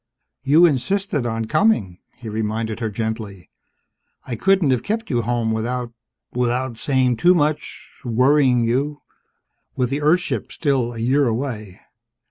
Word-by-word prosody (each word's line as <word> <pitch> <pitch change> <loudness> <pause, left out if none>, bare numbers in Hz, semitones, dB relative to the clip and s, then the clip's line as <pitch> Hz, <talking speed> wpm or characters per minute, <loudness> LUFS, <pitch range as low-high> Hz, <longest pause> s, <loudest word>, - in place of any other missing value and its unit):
"You 150 +6 +5
insisted 155 -1 0
on 115 -1 -2
coming," 115 - +1 0.2
he 120 - -11
reminded 110 +1 -3
her 115 -2 -2
gently. 110 -3 -5 0.7
"I 120 - -4
couldn't 190 - +3
have 125 -3 +1
kept 220 -3 -3
you 120 -2 +1
home 115 -1 -1
without 120 +2 -3 0.4
without 125 -1 -1
saying 130 -5 +1
too 180 +10 +5
much, 150 -2 -2
worrying 125 +1 +3
you 140 +6 -1 0.7
with 125 -1 -1
the 140 +2 -1
Earth 160 +5 +4
ship - - -4
still 130 -6 0
a - - -7
year 130 +5 +2
away. 110 -5 -4
125 Hz, 140 wpm, -21 LUFS, 115-145 Hz, 0.7 s, You